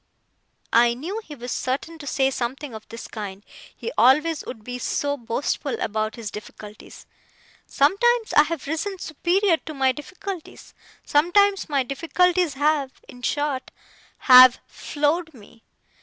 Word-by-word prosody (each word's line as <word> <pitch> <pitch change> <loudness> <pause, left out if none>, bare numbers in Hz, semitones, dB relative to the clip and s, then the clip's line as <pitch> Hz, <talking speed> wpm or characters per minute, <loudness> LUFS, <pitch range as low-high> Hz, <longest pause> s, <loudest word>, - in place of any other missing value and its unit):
I 235 0 +5
knew 365 - -5
he 300 - -10
was 245 -1 -7
certain 285 +6 -3
to 290 - -9
say 270 0 +1
something 260 +2 -4
of 220 0 -10
this 230 - -8
kind; 200 -2 -8 0.3
he 465 - -6
always 300 +5 +4
would 220 -4 -8
be 250 +2 -6
so 285 +3 -1
boastful 265 - -3
about 215 0 -2
his 230 -4 -6
difficulties. 210 0 -11 0.6
'Sometimes 445 +10 +2
I - - +7
have 330 -3 -5
risen 325 +7 -3
superior 350 +3 +1
to 310 -1 -9
my 265 -1 +2
difficulties. 355 +5 -9 0.3
Sometimes 385 +6 +3
my 280 -3 +1
difficulties 335 +4 +1
have 290 -2 +1
in 245 - -13
short, 290 +1 -2 0.5
have 255 -1 +8
floored 315 +2 -2
me. 225 0 -17
285 Hz, 140 wpm, -23 LUFS, 245-330 Hz, 0.6 s, have